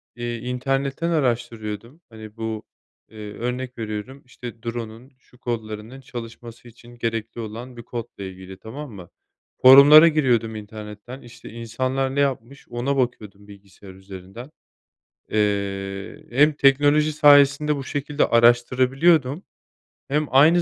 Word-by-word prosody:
eee, 120 0 -4
internetten 135 +6 -2
araştırıyordum, 120 - -3
hani, 110 -1 -12
bu, 110 -1 -4 0.5
eee, 105 -1 -9
örnek 125 +2 -5
veriyorum, 110 +5 -6
işte, 120 -2 -10
drone'un 115 +2 -7
şu 125 -1 -25
kodlarının 110 +2 -6
çalışması 120 -1 -10
için 120 +1 -16
gerekli 115 0 -4
olan 120 +3 -8
bir 120 - -9
kodla 115 -4 -7
ilgili, 95 0 -10
tamam 130 +6 -9
mı? 90 -4 -11 0.5
Forumlara 140 +5 +9
giriyordum 120 -8 +1
internetten, 105 +4 -9
işte, 120 0 -13
insanlar 130 +4 -3
ne 140 - 0
yapmış 140 -1 -2
ona 130 +4 -2
bakıyordum 105 -5 -3
bilgisayar 100 -1 -15
üzerinden. 95 +7 -11 0.8
Eee, 100 -2 -2
hem 145 +5 +4
teknoloji 145 +2 +3
sayesinde 145 0 +5
bu 135 - -6
şekilde 145 +1 -1
araştırabiliyordum. 130 +6 +3 0.7
Hem 150 +2 0
aynı 155 +7 +5
120 Hz, 120 wpm, -22 LUFS, 110-135 Hz, 0.8 s, Forumlara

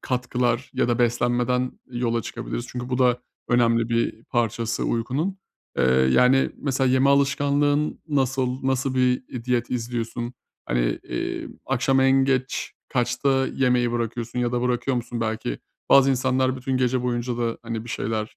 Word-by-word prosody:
katkılar 125 -1 -1
ya - - +1
da 120 0 +1
beslenmeden 120 +1 +1 0.2
yola 120 -2 -1
çıkabiliriz. 120 0 -5
Çünkü, 125 0 -5
bu 125 0 -1
da 125 -1 +3 0.3
önemli 115 -1 +3
bir 115 -1 -1
parçası 115 -1 -1
uykunun. 135 +12 -1 0.4
Eee, - - +4
yani, 125 - +4
mesela, 135 -2 0
yeme 130 +2 +4
alışkanlığın 145 +1 +2
nasıl, 130 -2 0
nasıl 135 0 0
bir, 125 0 +2
eee, 120 -2 -7
diyet 120 -1 0
izliyorsun? 120 0 -3 0.3
Hani, - - 0
eee, - - -4 0.2
akşam 135 +1 +2
en 135 0 +4
geç 130 -1 -1 0.2
kaçta 130 +2 +1
yemeği 125 -2 +1
bırakıyorsun 120 +1 -3
ya 120 0 0
da 120 0 0
bırakıyor 125 +1 0
musun 120 0 -4
belki? 110 - -2 0.3
Bazı 135 0 +6
insanlar 130 0 +1
bütün 130 +1 -2
gece 130 0 +1
boyunca 120 -1 -1
da, 115 -1 -1
hani, 115 -1 -4
bir - - -11
şeyler 110 -1 -3
125 Hz, 150 wpm, -24 LUFS, 120-130 Hz, 0.4 s, Bazı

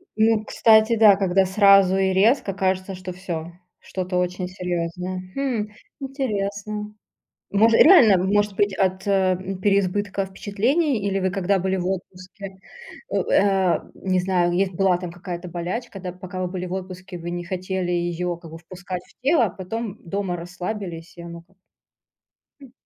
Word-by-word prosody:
Ну, 220 0 +3
кстати, 220 +1 +4
да, 215 -3 +7
когда 190 -1 +2
сразу 195 -1 +5
и 190 0 +2
резко 200 +1 +3
кажется, 190 0 -1
что 185 0 -7
всё, 175 -2 -6 0.3
что-то 185 -1 -4
очень 180 0 -1
серьёзное. 180 0 -4
Хм, 250 -6 -1 0.3
интересно. 210 -6 -4 0.6
Мож 220 +3 +4
реально, 235 - +7
может 205 +1 +1
быть, 205 -1 +1
от 190 0 0
э, 200 - +1
м, 190 0 0
переизбытка 200 0 +1
впечатлений? 220 - 0
Или 195 0 0
вы 190 0 0
когда 195 +1 0
были 190 +1 0
в 180 - -3
отпуске, 190 +1 -7 0.5
у - - -3 0.2
э, 195 -3 +3 0.2
не 185 -1 0
знаю, 180 -1 +1
если 185 0 0
была 185 -1 +3
там 180 -2 -6
какая-то 175 0 -7
болячка, 180 +5 -5
да, 180 -1 -5
пока 185 +1 -7
вы - - -1
были 180 0 -5
в 180 - -5
отпуске, 185 -1 -7
вы 170 +1 -6
не 175 0 -4
хотели 185 0 -3
её, 175 0 -1
как 165 -2 -13
бы, 165 - -9
впускать 180 +1 -7
в - - -27
тело, 285 -3 +4
а 200 - -2
потом 210 +3 -6
дома 190 0 -2
расслабились, 175 -1 -6
и - - -8
оно 170 0 -9
как 185 +2 -30 1.0
М. 265 - -14
190 Hz, 165 wpm, -23 LUFS, 180-205 Hz, 1.0 s, да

